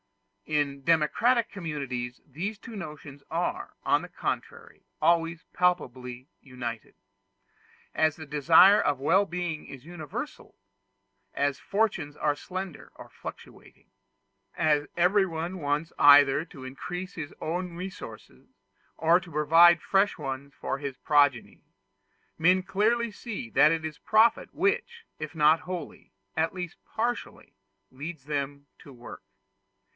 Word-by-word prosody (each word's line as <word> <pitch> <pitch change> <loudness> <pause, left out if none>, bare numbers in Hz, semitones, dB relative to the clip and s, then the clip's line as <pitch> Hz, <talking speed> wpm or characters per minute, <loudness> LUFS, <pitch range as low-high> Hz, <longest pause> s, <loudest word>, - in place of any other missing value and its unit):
In 140 -2 -1
democratic 170 - +3
communities 135 -9 -5
these 180 +10 -5
two 230 +2 -11
notions 150 -6 -9
are, - - -3
on - - +3
the - - -9
contrary, - - -5 0.2
always 165 +1 +2
palpably 130 -8 -1
united. 120 -4 -7 1.0
As 155 -1 +2
the 155 - -8
desire 160 +7 +6
of 140 -2 0
well 185 +9 +3
being 175 -3 -4
is 135 0 -11
universal 160 -4 -7 0.8
as 140 -1 0
fortunes 190 -8 -1
are 150 -1 +1
slender 185 +2 -7
or - - -11
fluctuating - - -12 0.7
as 150 -2 +2
everyone 180 -1 +1
wants 150 +2 -1
either 145 0 +7
to 135 -6 -12
increase 175 +8 -6
his 160 -6 -6
own 175 +2 -3
resources, 185 +2 -9 0.5
or 165 +2 +4
to 175 -1 -13
provide 165 +3 +6
fresh 195 +1 +2
ones 140 -2 -6
for 135 - -3
his 140 -2 -5
progeny, 145 -4 +2 0.8
men 180 +3 +4
clearly 220 +5 +1
see 205 - -6
that 150 - +6
it 165 -1 -1
is 160 0 -6
profit 220 +4 +3
which, 455 +5 -1
if 155 +1 -6
not 155 +1 +4
wholly, 180 -4 -7 0.2
at 160 +1 0
least 180 -1 -6
partially, 240 +2 -4 0.4
leads 145 +1 -8
them 140 -1 -3
to 140 - -14
work. 120 -2 -11
160 Hz, 125 wpm, -27 LUFS, 145-180 Hz, 1.0 s, either